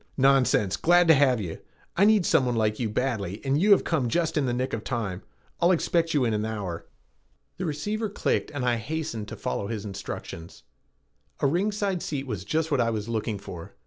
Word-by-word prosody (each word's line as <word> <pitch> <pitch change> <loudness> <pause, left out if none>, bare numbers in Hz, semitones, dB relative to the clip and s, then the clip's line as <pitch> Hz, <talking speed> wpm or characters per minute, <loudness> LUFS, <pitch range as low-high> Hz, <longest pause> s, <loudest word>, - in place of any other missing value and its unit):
"Nonsense, 130 -8 +3
glad 175 +1 +4
to - - +10
have 130 -4 +4
you. 90 -6 -5 0.4
I 195 - +4
needed 210 -4 +4
someone 130 -6 +2
like 110 -1 0
you 115 -3 -1
badly 105 -4 -2
and 135 +3 +1
you 205 - +3
have 200 - +6
come 140 -8 0
just 165 +3 0
in 145 -4 +1
the - - +1
nick 130 +2 -2
of 110 - -3
time. 105 -7 -3 0.4
I'll 170 - +4
expect 165 -2 +1
you 135 -4 +3
in 115 - +1
an 105 0 0
hour." 100 -6 -4 0.7
The 185 0 -3
receiver 210 +9 -2
clicked 200 - -1
and 145 -4 -3
I 120 -1 +2
hastened 115 -3 -4
to - - -7
follow 65 +11 -3
his 110 -2 -4
instructions. 95 -4 -7 0.8
A - - 0
ringside 195 +4 0
seat 140 -2 -3
was 105 -8 -4
just 160 - -1
what 140 - +3
I 115 - +2
was 110 -1 -3
looking 110 -2 -2
for. 90 -4 -9
130 Hz, 205 wpm, -26 LUFS, 105-160 Hz, 0.8 s, to